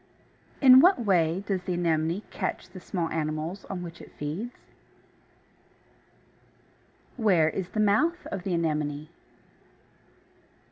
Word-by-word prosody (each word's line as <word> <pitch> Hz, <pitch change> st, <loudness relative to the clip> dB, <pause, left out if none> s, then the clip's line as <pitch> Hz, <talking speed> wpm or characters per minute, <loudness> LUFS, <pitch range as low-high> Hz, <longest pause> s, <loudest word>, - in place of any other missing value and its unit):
2. -, -, -1 dB
In 255 Hz, 0 st, +10 dB
what 310 Hz, -, +4 dB
way 175 Hz, -1 st, +2 dB
does 195 Hz, -3 st, -1 dB
the 180 Hz, 0 st, -3 dB
Anemone 170 Hz, +2 st, 0 dB
catch -, -, -4 dB
the 185 Hz, -, -9 dB
small 175 Hz, -2 st, -3 dB
animals 155 Hz, +4 st, -3 dB
on 180 Hz, -2 st, -5 dB
which 170 Hz, 0 st, -9 dB
it -, -, -13 dB
feeds? 165 Hz, +12 st, -4 dB, 2.7 s
3. 235 Hz, -, -6 dB
Where 170 Hz, -6 st, +4 dB
is 190 Hz, -2 st, -4 dB
the 215 Hz, -, -4 dB
mouth 300 Hz, -, +2 dB
of 190 Hz, -, -3 dB
the 180 Hz, -1 st, -2 dB
Anemone? 150 Hz, -2 st, -2 dB
175 Hz, 130 wpm, -27 LUFS, 160-205 Hz, 2.7 s, In